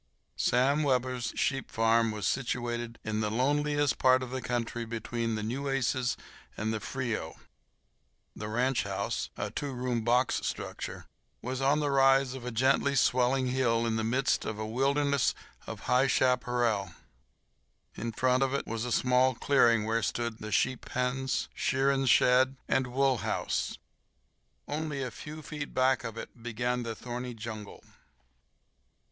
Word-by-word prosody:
Sam 135 +5 +2
Webber's 125 -4 0
sheep 135 -4 -1
ranch 115 0 +3
was 105 -3 -4
situated 120 -2 -2
in 110 0 -2
the 105 -1 0
loneliest 145 +4 +1
part 130 0 +5
of 125 - -7
the 130 0 -3
country 120 -1 -2
between 115 0 -3
the 110 - -3
Nueces 130 0 -1 0.4
and 110 +1 -1
the 110 - -2
Frio. 115 -8 -3 1.0
The 105 - -5
ranch 125 +4 +1
house—a - - -3
two 145 -1 -3
room 125 -2 -2
box 125 +2 +2
structure—was 130 +2 -6
on 140 +3 +3
the 145 -1 0
rise 135 -1 +4
of 130 -2 -7
a - - -2
gently 135 +4 +2
swelling 130 0 +3
hill 120 -3 +1
in 115 -1 0
the 110 - 0
midst 125 +5 +1
of 110 - -4
a 110 - -3
wilderness 140 +3 +1 0.3
of - - -6
high 125 +2 +3
chaparral. 120 -8 +1 1.0
In 115 +1 -4
front 125 +3 +2
of 135 0 +1
it - - -2
was 115 +1 -3
a 125 - -3
small 125 +1 +3
clearing 115 -5 +3
where 115 +1 +1
stood 115 +1 -2
the 110 - -6
sheep 130 +5 +1
pens, 125 +1 -1
shearing 135 0 +1
shed, 130 +2 +5
and 130 -1 +1
wool 130 +1 +2
house. - - -2 0.9
Only 150 -2 -3
a 125 - -4
few 155 +4 -9
feet 145 -1 -6
back 130 +1 +3
of 115 0 -6
it 115 - -9
began 120 +1 -1
the 115 -2 -4
thorny 125 0 -6
jungle. 110 -2 -8
125 Hz, 150 wpm, -30 LUFS, 115-135 Hz, 1.0 s, part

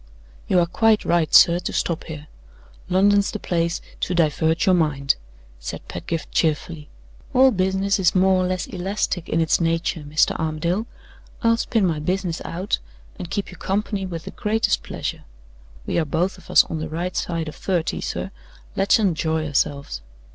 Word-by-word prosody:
"You 185 - +2
are 175 - +5
quite 220 +5 +2
right, 170 -3 +2
sir, 170 0 +7
to 180 - -4
stop 170 -1 -1
here; 155 -2 -8 0.6
London's 200 +2 +4
the - - -4
place 170 -3 -1 0.2
to 180 - -1
divert 160 +2 +2
your 190 - +5
mind," 150 -5 +2 0.5
said - - -7
Pedgift, 160 - -5
cheerfully. 155 -1 -1 0.5
"All 260 +1 +7
business 190 0 +1
is 185 0 +3
more 185 0 +4
or - - 0
less 185 0 -2
elastic 185 -1 -3
in 165 - +1
its 165 +1 +2
nature, 165 0 0
Mr. 150 +1 +2
Armadale; 170 +7 -1 0.6
I'll 230 0 +5
spin 225 -3 +1
my 160 -4 0
business 180 +1 -2
out, 180 +4 -2 0.4
and 175 - -6
keep 200 +2 -3
you 180 - -12
company 195 +1 -2
with 165 -3 -6
the - - -6
greatest 220 +1 0
pleasure. - - -5 0.6
We - - 0
are 160 - 0
both 180 +5 -1
of - - -18
us - - +7
on 160 - -5
the 155 - -4
right 175 +3 -3
side 165 -2 -2
of 155 - -6
thirty, 180 -4 -1
sir; 195 - -4 0.4
let's 195 0 +4
enjoy 160 -6 0
ourselves. 140 - -1
175 Hz, 170 wpm, -22 LUFS, 160-190 Hz, 0.6 s, sir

